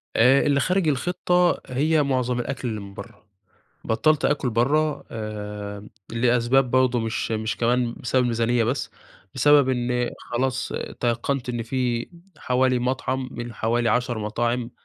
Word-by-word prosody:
آآ، 125 +4 +5
اللي 140 -1 +3
خارج 185 +2 +1
الخطّة، 180 +5 +1
هي 150 +4 +2
معظم 125 -3 0
الأكل 130 +1 -3
اللي 110 -2 -3
من 100 -1 -10
برّه، 100 +1 -11 0.6
بطّلت 150 +7 +2
آكل 135 -4 +1
برّه 145 +7 +1
آآ 105 -2 -6 0.2
لأسباب 120 +2 +2
برضه 130 -1 +3
مش 115 0 -2
مش 110 0 -2
كمان 120 0 +1
بسبب 125 +1 +1
الميزانية 120 0 +1
بس، 130 +4 -2 0.4
بسبب 145 +1 +5
إن 125 -1 0
خلاص 130 +2 -2 0.3
تيقّنت 120 +2 -1
إن 120 -1 -2
في 120 0 -2 0.3
حوالي 130 0 +1
مطعم 130 +1 -2
من 120 0 -6
حوالي 115 +2 0
10 120 +1 0
مطاعم 120 +3 -1
125 Hz, 135 wpm, -24 LUFS, 115-130 Hz, 0.6 s, آآ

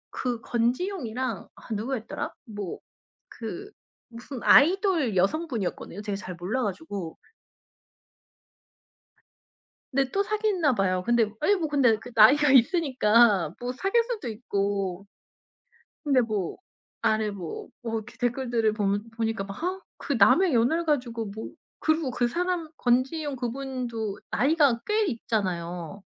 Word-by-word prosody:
그 245 -3 -2
권지용이랑 245 - -2
아 - - -8
누구였더라? 225 +2 -4
뭐 205 -6 -6 0.5
그 360 - -7 0.4
무슨 240 +3 -8
아이돌 335 - +5
여성분이었거든요. 205 - -1
제가 205 -1 -2
잘 185 -2 -7
몰라 190 +10 -2
가지고 185 -3 -5 2.7
근데 270 -1 +1
또 395 - +1
사귀나 405 -9 +1
봐요. 185 -2 +1
근데 235 +1 +3 0.2
예 405 +6 +4
뭐 335 -5 -1
근데 260 -7 +3
그 245 +2 -11
나이가 280 +6 +7
있으니까 235 - +4
뭐 245 0 -3
사귈 390 - +1
수도 460 - -5
있고. 200 -4 -2 1.0
근데 275 -4 +3
뭐 210 -6 -2 0.4
아래 215 -1 +2
뭐 185 -5 -7 0.2
뭐 230 -1 -4
이렇게 235 +3 -15
댓글들을 240 -3 0
보면 205 +1 -1
보니까 225 -2 -2
막 195 0 -8
아 375 +1 -1 0.2
그 285 - -1
남의 325 - +5
연애를 255 +9 +2
가지고 245 -7 -1
뭐. 215 +2 -7 0.3
그리고 315 -4 +1
그 245 0 +1
사람 350 +3 -2
권지용 270 +4 +1
그분도 245 -4 -4
나이가 280 -4 +3
꽤 425 0 +2
있잖아요. 190 - -3
240 Hz, 265 characters per minute, -26 LUFS, 210-290 Hz, 2.7 s, 나이가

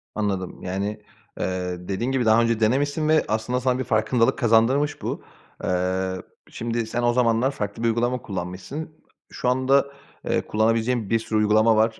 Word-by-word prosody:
Anladım. 100 -4 -2
Yani, 100 +3 -3 0.4
eee, 90 -1 -2
dediğin 115 +7 -1
gibi 130 -3 +1
daha 110 +1 +5
önce 115 -1 +1
denemişsin 145 +7 +1
ve 155 0 +4
aslında 110 +4 -1
sana 125 0 +1
bir - - 0
farkındalık 115 0 +2
kazandırmış 120 +6 +2
bu. - - -4 0.4
Eee, 95 +1 0 0.3
şimdi 115 0 -3
sen 120 +2 -2
o 120 0 +3
zamanlar 120 +1 +2
farklı 105 -3 -5
bir - - +3
uygulama 120 +2 0
kullanmışsın. 95 - -6 0.4
Şu 125 - -1
anda, 130 +2 +3 0.4
eee, - - +1
kullanabileceğin 115 0 +1
bir 115 - +2
sürü 110 -1 -1
uygulama 110 +1 +4
var. 110 +1 +2
115 Hz, 160 wpm, -24 LUFS, 105-125 Hz, 0.4 s, daha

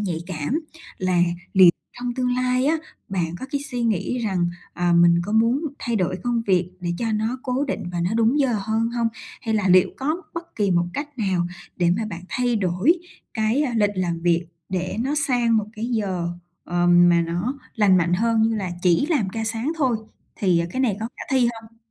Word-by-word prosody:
nhạy 180 -6 -2
cảm, 185 - -2 0.4
là 185 -2 +1 0.3
liệu 185 -2 +8 0.3
trong 245 0 -3
tương 250 -1 0
lai 255 +1 +1
á, 320 - +3 0.3
bạn 175 -4 -2
có 260 - -5
cái 280 - 0
suy 245 -2 -2
nghĩ 230 +2 0
rằng, 190 -6 0 0.3
ờ, 175 -1 +1
mình 170 0 +5
có 205 - -4
muốn 230 +5 +3 0.2
thay 235 -2 -1
đổi 185 -2 0
công 240 -1 0
việc 180 -2 +2
để 175 - -2
cho 225 -2 -1
nó 220 +4 -1
cố 255 +2 0
định 270 - -3
và 175 - -2
nó 175 +3 0
đúng 230 +5 +3
giờ 265 -5 +2
hơn 220 +3 0
hông? 235 -1 0 0.3
Hay 220 -2 -1
là 200 -3 +1
liệu 185 +1 +5
có 310 +7 -2
bất 335 0 -7
kỳ 205 -3 +1
một 175 -1 +3
cách 290 -2 -6
nào 185 -5 +1 0.3
để 175 -1 +2
mà 220 0 -2
bạn 175 -1 -6
thay 245 -2 0
đổi 195 - +2 0.4
cái, 220 +6 +1
a, 260 - -1
lịch 205 -2 +3
làm 175 -3 -1
việc 170 0 +1 0.2
để 185 0 -2
nó 270 +5 0
sang 240 -3 +2
một 210 -1 0
cái 220 - -3
giờ, 200 -8 -1 0.4
ờm, 175 0 +4
mà 170 -1 +4
nó 175 +12 -2 0.2
lành 205 -5 +4
mạnh 175 -1 +2
hơn 225 +3 +2
như 225 0 +2
là 195 -4 -2
chỉ 180 - +3
làm 280 - +1
ca 225 +3 -3
sáng 225 +6 -1
thôi 260 -7 +2 0.4
thì, 185 -4 +2
à, 170 - 0
cái 260 - -2
này 225 -7 +1
có 225 - -2
khả - - -7
thi 255 -3 +3
hông? 225 +1 -18
220 Hz, 215 wpm, -23 LUFS, 180-245 Hz, 0.4 s, liệu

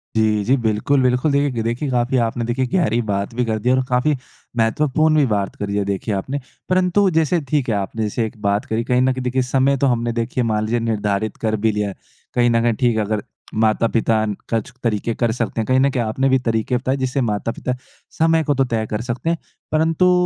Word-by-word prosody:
जी, 110 -1 +2
जी, 125 +6 +3
बिल्कुल, 110 +6 +2
बिल्कुल। 125 +3 +2
देख 140 -1 +1
देखिए, 120 +5 -2
काफ़ी 125 +1 +1
आपने 115 +1 -2
देखिए 120 +3 0
गहरी 120 - +2
बात 100 -1 -2
भी 125 - +1
कर 110 -1 -1
दी 120 - 0
है 130 - +5
और 130 - +1
काफ़ी 130 +4 +2 0.4
महत्वपूर्ण 150 +7 +2
भी 150 -2 +4
बात 100 -5 -1
करी 100 0 -3
है, 100 - +1
देखिए 100 +2 -2
आपने। 130 +9 -3 0.3
परंतु 185 +2 +3
जैसे 160 +2 +3
ठीक 140 -4 +1
है, 110 - +1
आपने 100 +3 -2
जैसे 110 +2 -1
एक 110 +1 -8
बात 100 0 +1
करी। 110 +1 -1
कहीं 125 +1 +2
न 130 +1 +3
कहीं 130 0 -5
देखिए, 125 +1 0
समय 135 +2 +2
तो 140 - +2
हमने 120 -2 +1
देखिए 115 +2 -1
मान 110 -2 0
लीजिए 120 +2 0
निर्धारित 110 -2 -1
कर 110 -1 0
भी 110 - +4
लिया 105 0 -1
है। 95 - -8 0.4
कहीं 120 0 +4
न 115 -1 +3
कहीं 120 -1 +3
ठीक 120 +1 +1
है, 110 - +2
अगर 105 -1 -2 0.4
माता-पिता 110 0 +2
न 105 -1 -2 0.2
कुछ 115 +2 -1
तरीके 115 0 0
कर 120 -2 +1
सकते 115 -1 -1
हैं। - - -2
कहीं 130 0 +3
न 135 +1 +4
कहीं 125 -3 0
आपने 130 +5 0
भी 130 0 +4
तरीके 115 +2 0
बताए 130 +2 -1
जिससे 130 +1 -1
माता-पिता 115 +2 -2 0.4
समय 160 0 +4
को 145 - +1
तो 135 0 +2
तय 110 -1 0
कर 105 0 -2
सकते 120 +6 -3
हैं। 170 - +1 0.3
परंतु 160 +3 +3
120 Hz, 230 wpm, -20 LUFS, 110-130 Hz, 0.4 s, है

